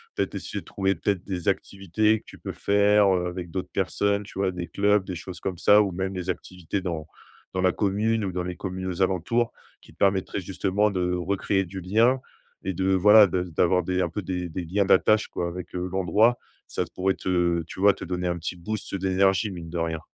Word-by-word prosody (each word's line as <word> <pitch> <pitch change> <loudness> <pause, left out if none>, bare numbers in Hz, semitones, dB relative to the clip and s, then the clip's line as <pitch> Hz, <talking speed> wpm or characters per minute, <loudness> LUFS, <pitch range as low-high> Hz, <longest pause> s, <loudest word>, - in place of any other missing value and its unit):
Peut-être - - -2
essayer - - -4
de - - -14
trouver 95 0 0
peut-être 95 +1 -1
des 90 -4 -4
activités 105 +3 +1
que - - -28
tu - - -12
peux - - -6
faire, 100 0 +3
heu, 90 -1 -1
avec 90 -1 -5
d'autres 95 +2 -5
personnes, 100 +2 0
tu 100 - -12
vois, 95 -1 +1
des 90 -1 -5
clubs, 100 0 +2
des 95 -1 -6
choses 90 +1 -8
comme 95 -2 -4
ça 105 +4 +6
ou 100 -2 0
même 95 +2 -3
des 90 -2 -5
activités 90 +1 -4
dans 80 -4 -4 0.5
dans 95 - +1
la 95 - +4
commune 105 +3 0
ou 95 - -2
dans 90 0 -2
les 90 0 -4
communes 95 0 -5
aux 90 0 -3
alentours, 95 +6 +1 0.3
qui - - -18
te - - -29
permettraient 95 0 +1
justement 100 +3 0
de 90 -2 -1
recréer 95 +2 0
du 95 +2 -7
lien 115 +8 +3 0.4
et 95 - -2
de, 95 +2 +1
voilà, 105 +3 +8
de 90 -1 -1
d'avoir 90 +1 +2
des 90 +2 -1
un 85 - -1
peu 95 +6 -4
des 90 -1 -3
des 85 +2 -5
liens 95 +4 0
d'attache, 110 +3 +4
quoi, 85 - -3
avec, 90 +1 -7
heu, 90 0 -2
l'endroit, 105 +6 +3 0.3
ça - - -2
pourrait 95 +1 +1
te, 85 -2 0
tu - - -9
vois, 100 0 +6
te - - -9
donner 90 0 -2
un 85 0 -1
petit 85 +2 -4
boost, 105 +5 -5
heu, - - 0
d'énergie, 95 +2 +2
mine 85 -3 -8
de 85 - -5
rien. 80 -1 -1
95 Hz, 225 wpm, -25 LUFS, 90-100 Hz, 0.5 s, voilà